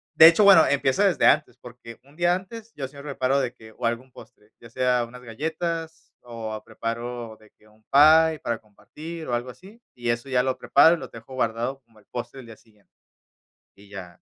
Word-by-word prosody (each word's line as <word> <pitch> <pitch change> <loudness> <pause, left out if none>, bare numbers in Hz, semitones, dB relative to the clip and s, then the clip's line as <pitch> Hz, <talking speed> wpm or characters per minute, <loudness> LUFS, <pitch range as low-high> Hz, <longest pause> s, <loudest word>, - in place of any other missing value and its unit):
de 160 - +10
hecho, 170 +5 +5
bueno, 195 -5 +8
empiezo 140 +5 +1
desde 195 -3 +2
antes, 120 - +2
porque 120 -2 -13
un 140 +2 -22
día 175 0 +2
antes, 220 +4 -9
yo 135 -2 -5
siempre 140 +1 -9
preparo 130 +2 +1
de 125 -3 -2
que 110 -3 -16
o - - -4
algún 120 +3 -3
postre, 105 -2 -17
ya 115 - -14
sea 125 0 0
unas 125 +2 -13
galletas, 160 +6 -5
o 110 -3 -7
preparo 115 -1 -6
de 110 -1 -21
que 110 - -26
un 110 +1 -26
pie 155 +4 +5
para 115 -1 -2
compartir, 155 +10 -11
o - - -2
algo 120 +1 -2
así, 195 - -15
y 120 -1 -4
eso 120 +2 -2
ya 125 -2 +1
lo 130 0 -2
preparo 150 +6 +5
y 165 - -9
lo - - -8
dejo 115 +3 -13
guardado 120 +2 -2
como 115 -2 -24
el 100 - -25
postre 125 +2 -6
del 125 - -12
día 110 -1 -12
siguiente. 105 -2 -29 0.9
Y 100 0 -18
ya, 90 -4 -10
125 Hz, 210 wpm, -24 LUFS, 115-155 Hz, 0.9 s, de